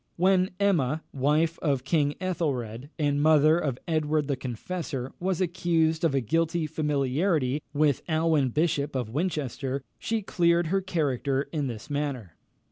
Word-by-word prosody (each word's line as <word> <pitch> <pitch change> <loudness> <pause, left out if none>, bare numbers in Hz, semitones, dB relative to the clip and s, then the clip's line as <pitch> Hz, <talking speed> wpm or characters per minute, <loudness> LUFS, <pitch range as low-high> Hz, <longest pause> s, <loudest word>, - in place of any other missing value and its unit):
When 185 +1 +3
Emma, 160 -7 +1
the 140 - -9
wife 155 +5 +2
of 140 -5 0
King 145 0 +1
Ethelred, 140 - -2
and 145 -2 +1
mother 155 +1 +5
of 140 -7 -2
Edward 155 -2 +1
the 140 - 0
Confessor, 130 +1 -5
was 185 -1 -1
accused 165 -3 +1
of 160 -5 +2
a 135 - +2
guilty 165 +6 0
familiarity 150 -1 0
with 145 -2 +2
Alwyn 155 -4 +2
Bishop 150 0 0
of 125 -4 -2
Winchester, 140 -4 -2 0.2
she 225 -2 -2
cleared 170 -2 +2
her 195 - +2
character 140 -6 0
in 150 -4 -1
this 115 -4 -6
manner. 140 - -3
150 Hz, 145 wpm, -27 LUFS, 135-165 Hz, 0.2 s, mother